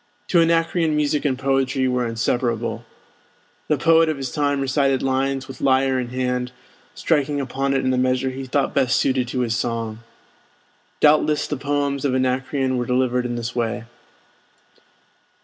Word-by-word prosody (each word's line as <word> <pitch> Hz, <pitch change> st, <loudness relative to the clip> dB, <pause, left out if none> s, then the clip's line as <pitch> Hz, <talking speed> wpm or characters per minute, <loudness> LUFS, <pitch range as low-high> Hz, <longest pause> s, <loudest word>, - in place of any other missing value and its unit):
To 170 Hz, -, +4 dB
Anacreon 165 Hz, -1 st, +2 dB
music 150 Hz, 0 st, 0 dB
and 130 Hz, -3 st, +1 dB
poetry 135 Hz, 0 st, 0 dB
were 125 Hz, -1 st, 0 dB
inseparable. 115 Hz, 0 st, -1 dB, 0.8 s
The 150 Hz, -, +2 dB
poet 165 Hz, +2 st, +4 dB
of 155 Hz, -, -2 dB
his 135 Hz, -2 st, -4 dB
time 145 Hz, -2 st, 0 dB
recited 135 Hz, 0 st, +1 dB
his -, -, -1 dB
lines 135 Hz, 0 st, -1 dB
with 135 Hz, -, -10 dB
lyre 130 Hz, -1 st, +2 dB
in 125 Hz, -, -3 dB
hand, 125 Hz, 0 st, -2 dB, 0.4 s
striking 145 Hz, -2 st, 0 dB
upon 135 Hz, 0 st, -1 dB
it 135 Hz, -, +2 dB
in 130 Hz, -, +2 dB
the 130 Hz, -, +1 dB
measure 130 Hz, +1 st, +1 dB
he 135 Hz, +1 st, -6 dB
thought 135 Hz, +2 st, 0 dB
best 130 Hz, -2 st, +2 dB
suited 130 Hz, -2 st, +1 dB
to 125 Hz, +1 st, -2 dB
his 115 Hz, -2 st, 0 dB
song. 115 Hz, -2 st, -3 dB, 1.0 s
Doubtless 150 Hz, 0 st, +4 dB
the 150 Hz, -, -3 dB
poems 140 Hz, 0 st, -1 dB
of 135 Hz, -3 st, +1 dB
Anacreon 130 Hz, +1 st, 0 dB
were 120 Hz, -1 st, -2 dB
delivered 125 Hz, -1 st, +1 dB
in 120 Hz, -, -4 dB
this 120 Hz, +1 st, -4 dB
way. 120 Hz, -1 st, -2 dB
130 Hz, 165 wpm, -22 LUFS, 125-140 Hz, 1.0 s, To